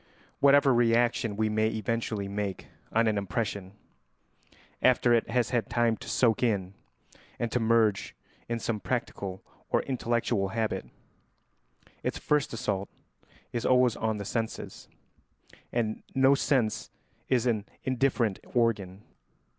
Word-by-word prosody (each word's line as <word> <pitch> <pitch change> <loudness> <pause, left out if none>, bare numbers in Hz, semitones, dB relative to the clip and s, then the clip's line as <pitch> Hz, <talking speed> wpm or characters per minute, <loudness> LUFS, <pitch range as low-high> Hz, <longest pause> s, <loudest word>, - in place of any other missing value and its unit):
Whatever 140 -1 +6
reaction 115 -2 +2
we 110 0 +2
may 110 0 +1
eventually 110 -1 -2
make 100 -1 -3 0.3
on 115 +1 +3
an 110 -2 +2
impression, 100 0 -3 1.1
after 125 -1 +4
it 115 - +2
has 120 0 +1
had 120 0 0
time 120 -1 +2
to - - -9
soak 115 -4 +2
in 100 -6 0 0.6
and 120 - -2
to 125 - +1
merge 110 -3 +2 0.3
in 120 - 0
some 115 -1 -2
practical 100 -6 -3 0.3
or - - +2
intellectual 120 -5 0
habit, 110 +2 -2 1.1
its - - -2
first 150 -1 +1
assault 100 -4 -2 0.6
is 120 - -2
always 125 -2 +4
on 110 -1 -1
the 100 - -5
senses, 115 +2 -4 0.8
and 110 -2 -1
no 135 +1 +5
sense 130 -6 +1 0.4
is 125 -2 +2
an 110 -4 +1 0.2
indifferent 125 -5 +1 0.2
organ. 105 -5 0
115 Hz, 125 wpm, -28 LUFS, 105-120 Hz, 1.1 s, Whatever